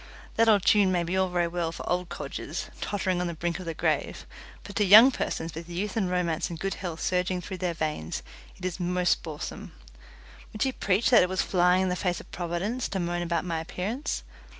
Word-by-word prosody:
That 225 0 +4
old 205 -4 +4
tune 205 -3 +5
may 175 -2 +1
be 175 +2 -2
all 190 0 +2
very 175 -1 +1
well 170 -1 -2
for - - -8
old 180 0 -1
codgers 175 - -5
tottering 190 -3 -1
on 180 - -1
the 170 - -4
brink 170 +2 -2
of 185 - -7
the 165 -1 -4
grave, - - -1 0.4
but 200 - -10
to 210 - +4
young 215 +7 +9
persons 165 -9 -3
with 165 +2 -8
youth 190 +3 -3
and 195 -5 0
romance 180 -2 0
and 170 -2 -6
good 195 +2 -1
health 170 -4 -5
surging 180 0 0
through 185 +1 -7
their 180 -2 -1
veins, 150 - -3 0.3
it - - -8
is 185 0 -3
most 180 0 +1
boresome. 155 -3 -7 0.8
Would 215 - 0
she 265 - +1
preach 205 0 +1
that 235 - +8
it 180 - +2
was 185 - 0
flying 180 0 +3
in 190 - 0
the 180 - 0
face 180 -1 -1
of - - -14
providence 180 +8 -2
to 195 - -2
moan 175 0 -1
about 170 0 -1
my 165 -2 -1
appearance? 200 - -3
180 Hz, 220 wpm, -27 LUFS, 170-195 Hz, 0.8 s, young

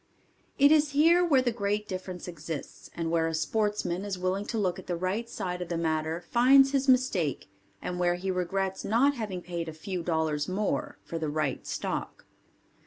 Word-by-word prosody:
It 285 +1 +6
is 300 -2 +4
here 335 +5 +5
where 280 -7 +4
the 245 - +1
great 210 -1 -1
difference 185 -2 -6
exists 160 -3 -7
and 165 -1 -2
where 165 -1 +2
a 165 - -2
sportsman 200 +1 -1
is 200 -2 -3
willing 185 +3 -1
to 230 - -2
look 185 -4 0
at - - -12
the 175 - -1
right 190 +7 -2
side 180 -5 -4
of 175 - -5
the 170 - -1
matter 160 +1 -1
finds 270 +3 +6
his 275 -1 +1
mistake 220 - +2 0.4
and 180 0 -3
where 175 0 +2
he 190 +2 -2
regrets 190 +1 -2
not 250 +7 +3
having 205 -8 -5
paid 170 -2 -4
a - - -7
few 180 +3 -4
dollars 160 -3 0
more 200 +2 -1
for 165 - -5
the 155 -2 -2
right 145 -3 -2
stock. - - -4
185 Hz, 190 wpm, -28 LUFS, 170-225 Hz, 0.4 s, It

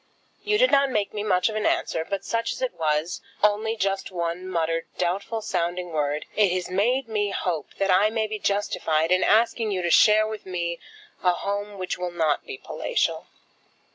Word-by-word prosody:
You 420 0 +2
did - - +4
not 275 0 +4
make 210 -5 -1
me 210 - -3
much 185 -4 +2
of 220 - -3
an 215 - +1
answer; 160 - 0
but 195 +3 -4
such 230 0 -1
as - - -9
it 255 - -1
was, 155 +2 -1 0.2
only 215 +2 +2
just 195 -2 -1
one 175 0 -3
muttered 165 -2 -1
doubtful 200 +5 -2
sounding 175 -2 -2
word, 150 -1 -1
it 205 -4 +4
has 180 -1 -3
made 240 +7 +1
me 210 -2 0
hope 175 -6 -3
that 195 -1 +1
I 195 +4 +5
may 220 0 0
be 215 0 -4
justified 165 -6 0
in 185 0 +4
asking 225 0 +3
you 185 -3 -1
to 170 - 0
share 215 0 +6
with 215 0 -6
me 170 -2 -3 0.4
a 180 -1 +3
home 200 +2 -4
which 185 -1 -3
will 180 0 -2
not 160 -4 0
be 410 - -6
palatial. - - -2
195 Hz, 195 wpm, -25 LUFS, 175-215 Hz, 0.4 s, share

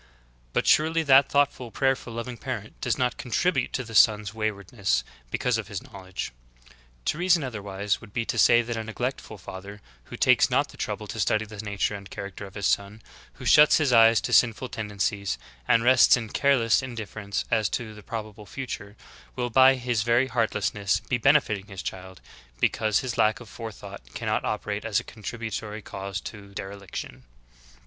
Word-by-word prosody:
] - - -34
But - - +1
surely 160 +1 +3
that 135 -1 +6
thoughtful, 140 -4 +1
prayerful, 135 0 0
loving 115 +2 -5
parent - - -6
doe"s^ - - 0
not 125 -1 0
contribute 135 +3 0
to 130 - -1
the 115 -1 -10
son's 105 -2 +4
wayward 110 -3 -4
ness 95 - +1 0.3
because 125 - 0
of 105 - -5
his 100 -2 -6
knowledge. 95 -7 -7 0.7
To 155 - -1
reason 175 -3 +3
otherwise 100 -5 -3
would 115 - -13
be 115 +2 -2
to - - -2
say 120 0 +6
that 120 0 -4
a 110 - -3
neglectful 115 0 -4
father, 100 +2 -9 0.3
who - - -9
takes - - +4
not - - +1
the - - -14
trouble - - -4
to - - -7
study 110 0 +1
the 110 0 -11
nature 105 0 -2
and 100 -1 -8
character 100 +1 -7
of 95 - -16
his 100 - -3
son, 100 +3 0 0.3
who - - -11
shuts 150 0 +7
his 145 -5 +2
eyes 115 -1 +7
to - - -3
sinful 120 +1 +3
tendencies, 100 - -2 0.3
and 115 0 +4
rests 125 +1 +6
in 115 -3 -5
careless 125 -3 +3
indifference 110 -5 -5
as 110 -3 +2
to 110 -3 -4
the 105 - -12
probable 105 -1 -7
future, 105 -5 -6 0.4
will 125 -1 -2
by 130 +2 +7
his 120 -3 -1
very 120 +3 +3
heartlessness 105 -5 0
be 120 - -2
benefitting 115 -7 +3
his 95 -3 -8
child, 95 0 -7 0.4
because 105 - +2
his 125 -3 -4
lack 110 0 +3
of 120 - -12
forethought 110 - -9
cannot - - -1
operate 105 0 -3
as 110 -3 +1
a - - -8
contributory 110 -1 -6
cause 95 +1 -5
to 100 -2 -10
dereliction. 100 -1 -7
110 Hz, 180 wpm, -26 LUFS, 100-125 Hz, 0.7 s, shuts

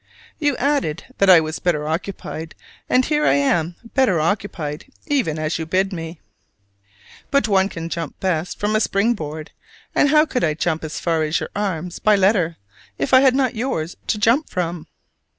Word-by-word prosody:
You 290 -4 +1
added 265 - 0 0.2
that 195 - +4
I 180 -3 +9
was 155 +1 -4
better 150 -4 0
occupied 160 -1 -5 0.3
and 255 0 +3
here 300 -1 +1
I 135 - +4
am 160 +4 +1 0.2
"better 245 - +3
occupied" 160 -4 -2 0.2
even 255 - 0
as 155 +1 -2
you 160 - -4
bid 190 +3 +1
me. 165 -1 -6 1.1
But 280 -3 +2
one 195 -2 +3
can 165 -3 -6
jump 165 -2 -5
best 180 -2 -2
from 210 +1 0
a - - +4
spring 215 +3 +2
board: 155 -5 -7 0.4
and 290 - +3
how 305 +1 +5
could 250 -5 -2
I 155 -2 +1
jump 160 0 -1
as 155 0 -5
far 165 -2 0
as 155 +1 0
your - - -5
arms 180 -4 -3
by 215 -1 +4
letter, 185 -4 +2 0.4
if 140 - -2
I 260 - +8
had 265 -2 +4
not 260 -2 +1
yours 220 -9 -3
to - - 0
jump 230 +8 +2
from? 175 -2 -3
180 Hz, 185 wpm, -21 LUFS, 160-225 Hz, 1.1 s, I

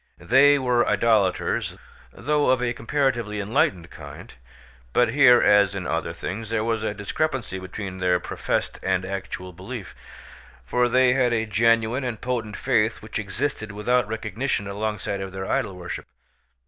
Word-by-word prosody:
They 140 +3 +5
were 125 -3 +2
idolaters, 105 -3 +1 0.3
though 145 - 0
of 130 0 +4
a 120 -1 -1
comparatively 120 -3 -1
enlightened 100 - 0
kind; - - -11 0.6
but 120 - +3
here, 125 -1 +6
as 100 -1 +4
in 95 -2 -4
other 80 0 -2
things, 105 +4 -6
there 115 -1 0
was 115 -1 -1
a 110 -1 -2
discrepancy 120 -2 -2
between 95 0 -7
their 90 -1 +2
professed - - -3
and 95 -1 0
actual 95 -1 -6
belief, - - -8 0.7
for 125 - +1
they 125 0 +4
had 125 -2 +2
a 110 -1 0
genuine 115 +3 +2
and 120 -4 -3
potent 120 -4 -3
faith 110 0 +1
which 110 - -4
existed 110 +2 -3
without 105 +3 +1
recognition 110 +1 -2
alongside 100 -1 -3
of 95 0 -5
their 95 0 -5
idol 95 0 -1
worship. 90 -1 -7
110 Hz, 150 wpm, -24 LUFS, 100-125 Hz, 0.7 s, here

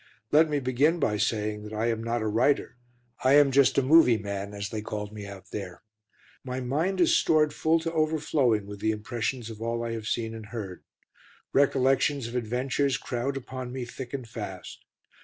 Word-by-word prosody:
Let 155 +2 +5
me 145 -1 +1
begin 135 +6 +2
by 105 -7 +1
saying 105 0 -1
that 105 +1 -9
I 110 +1 -1
am 115 0 -3
not 115 0 -1
a - - -1
writer, 120 +7 +1 0.5
I 130 +1 +5
am 145 -1 +6
just 140 0 +4
a 135 - +4
"movie 135 -4 +6
man," 100 -1 -5
as 100 -1 -5
they 110 0 -4
called 105 0 -5
me 105 -1 -7
out 95 -1 -11
there. 95 -3 -6 0.6
My 130 0 -4
mind 150 +10 -1
is 340 0 +4
stored 155 - +3
full 160 +1 +2
to 165 0 -3
overflowing 150 -8 +1
with 100 0 -8
the 110 - 0
impressions 115 +2 -3
of 110 0 -10
all 115 +1 -2
I 115 - -3
have 110 -1 -5
seen 115 -1 -2
and 110 -2 -8
heard; 105 -5 -7 0.7
recollections 135 0 +3
of 115 - -7
adventures 130 +4 0
crowd 130 +3 -3
upon 130 -1 -6
me 130 -1 -4
thick 120 +1 -8
and 130 -4 -5
fast. 105 -5 -8
120 Hz, 195 wpm, -27 LUFS, 105-140 Hz, 0.7 s, am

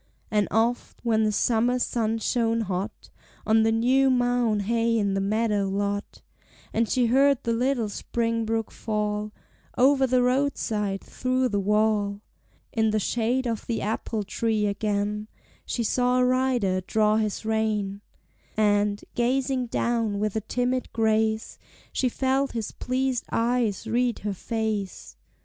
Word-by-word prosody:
And 210 -1 +2
oft, 230 +3 0
when 220 -1 +3
the 215 - +2
summer 240 +3 +2
sun 225 -2 0
shone 230 0 0
hot 195 +1 -4 0.3
On 220 0 +4
the 225 0 +3
new 255 +4 +3
mown 245 -4 +2
hay 230 +2 +1
in 200 -2 +1
the 195 - 0
meadow 210 0 +1
lot, 200 +1 -3 0.5
And 225 0 +1
she 250 -2 +2
heard 270 +3 +3
the 230 - 0
little 245 -1 0
spring 230 +2 -2
brook 225 0 -2
fall 210 -1 -2 0.5
Over 265 +1 +4
the 250 0 +3
roadside, 230 -7 0
through 255 0 -1
the 205 -2 0
wall, 205 0 +1 0.5
In 220 -1 +2
the 215 - +1
shade 240 +5 0
of 230 -3 -3
the 230 - -2
apple 215 0 -2
tree 215 +1 0
again 210 +1 -1 0.4
She 235 - -1
saw 250 +3 +2
a 250 - +4
rider 250 -7 +1
draw 215 +3 +2
his 215 0 -2
rein, 215 -2 -1 0.6
And, 205 -1 +2
gazing 255 +1 0
down 230 -3 0
with 210 0 -1
a 220 - 0
timid 250 +3 -1
grace, 220 0 0 0.3
She 255 - +1
felt 265 +2 0
his 225 -3 -3
pleased 255 -1 -1
eyes 230 -3 0
read 240 +1 +1
her 205 - 0
face. 215 -1 -3
225 Hz, 145 wpm, -26 LUFS, 210-245 Hz, 0.6 s, On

